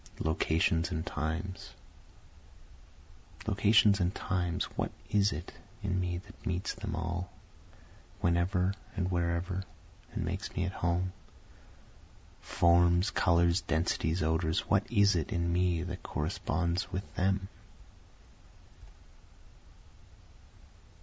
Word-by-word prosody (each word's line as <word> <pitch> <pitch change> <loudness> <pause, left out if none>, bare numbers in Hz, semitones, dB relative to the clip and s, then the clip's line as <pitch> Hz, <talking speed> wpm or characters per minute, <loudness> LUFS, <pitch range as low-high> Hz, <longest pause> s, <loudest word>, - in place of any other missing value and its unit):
Locations 80 +1 +1
and 80 -2 -3
Times 85 +4 -4 1.7
Locations 105 0 +4
and 90 +1 0
times 90 -1 -1
what - - -1 0.2
is 105 -1 +4
it 85 +4 -6 0.3
in 95 -2 0
me 90 -1 -1
that 105 +4 -13
meets 90 0 -2
them 80 - -5
all, 85 +1 -3 0.9
whenever 90 +2 +2 0.2
and 95 -1 -1
wherever, 85 +2 -1 0.5
and 105 -6 -3
makes 95 +4 -4
me 90 - 0
at 95 - -2
home? 90 0 -1 1.3
Forms, 85 +2 +3
colors, 85 +1 +3
densities, 80 +1 0
odors 80 0 +1
what 100 +3 +2
is 100 -3 +5
it 85 +4 -1
in 85 -3 0
me 90 -2 +2
that 90 0 -5
corresponds 85 +4 -1
with 95 - -2
them? 95 +1 +1
90 Hz, 105 wpm, -31 LUFS, 85-95 Hz, 1.7 s, is